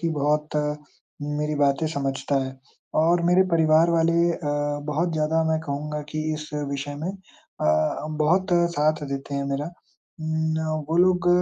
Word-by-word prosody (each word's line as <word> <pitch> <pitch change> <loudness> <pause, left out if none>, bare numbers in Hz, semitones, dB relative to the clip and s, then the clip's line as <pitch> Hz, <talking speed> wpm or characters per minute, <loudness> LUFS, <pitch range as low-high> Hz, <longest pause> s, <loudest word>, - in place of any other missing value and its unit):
कि 165 - 0
बहुत 150 0 0 0.7
मेरी 150 +1 -2
बातें 145 +1 +2
समझता 140 0 -2
है 130 0 -8 0.4
और 170 +2 +3
मेरे 180 +2 +5
परिवार 160 0 +4
वाले 170 +1 +3
अ, - - -5 0.5
बहुत 165 +3 0
ज़्यादा 160 +1 +1
मैं 160 - +2
कहूँगा 150 0 -4
कि 155 - -2
इस 150 0 -7 0.2
विषय 140 +1 -4
में 175 - -1
अ, 80 - -2
बहुत 180 +5 +2 0.2
साथ 155 +1 +2
देते 140 +1 -4
हैं 140 0 -1
मेरा। 140 +2 -1 0.5
उम, 160 0 -3 0.3
न 155 -1 -2
वो 165 - 0
लोग 180 0 +4
155 Hz, 150 wpm, -24 LUFS, 145-165 Hz, 0.7 s, मेरे